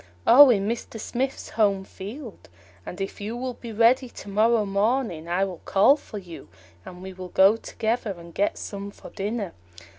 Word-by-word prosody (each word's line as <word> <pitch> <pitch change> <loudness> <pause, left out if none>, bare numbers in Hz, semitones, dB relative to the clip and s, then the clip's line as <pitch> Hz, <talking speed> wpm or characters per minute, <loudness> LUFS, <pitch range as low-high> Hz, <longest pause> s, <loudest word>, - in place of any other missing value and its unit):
"Oh, 280 +3 +9
in 200 -4 +2
Mr. 230 0 -4
Smith's 260 +5 -3
home 200 -3 +1
field; 205 - -10 0.4
and 180 - -7
if 195 +1 -5
you 220 +4 -4
will 255 0 -3
be 235 -1 -9
ready 235 +4 +3
to 205 - -11
morrow 215 +2 +3
morning, 200 -4 0
I 185 +3 +1
will 185 -3 -8
call 205 +9 +5
for 250 -7 -10
you, 180 -4 -10 0.3
and 180 - -11
we 190 0 -7
will 185 0 -8
go 195 +4 +5
together 225 -2 -3
and 170 0 -12
get 200 +4 0
some 200 0 -6
for - - -13
dinner." 205 -1 -4
205 Hz, 180 wpm, -25 LUFS, 190-235 Hz, 0.4 s, Oh